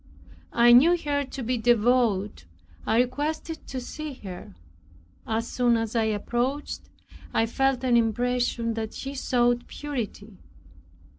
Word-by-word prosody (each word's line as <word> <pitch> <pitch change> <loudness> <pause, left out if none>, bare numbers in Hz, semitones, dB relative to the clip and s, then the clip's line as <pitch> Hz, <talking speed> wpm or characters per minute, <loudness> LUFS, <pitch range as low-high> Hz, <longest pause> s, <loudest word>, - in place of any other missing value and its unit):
I 240 0 +6
knew 325 +9 +7
her 290 -3 -1
to 265 0 -7
be 245 +1 -1
devout 225 - +2 0.4
I 220 - +2
requested 300 +6 -3
to 260 - -4
see 300 +4 -6
her. 180 - -9 0.7
As 225 +1 -1
soon 240 -2 +2
as 225 0 -3
I 225 -1 +2
approached, 240 +6 -2 0.5
I 225 - +3
felt 270 +3 0
an 250 -2 +3
impression 235 0 +1
that 220 -1 -5
she 275 +1 -5
sought 245 -2 +1
purity. 225 -8 -6
240 Hz, 130 wpm, -26 LUFS, 225-270 Hz, 0.7 s, knew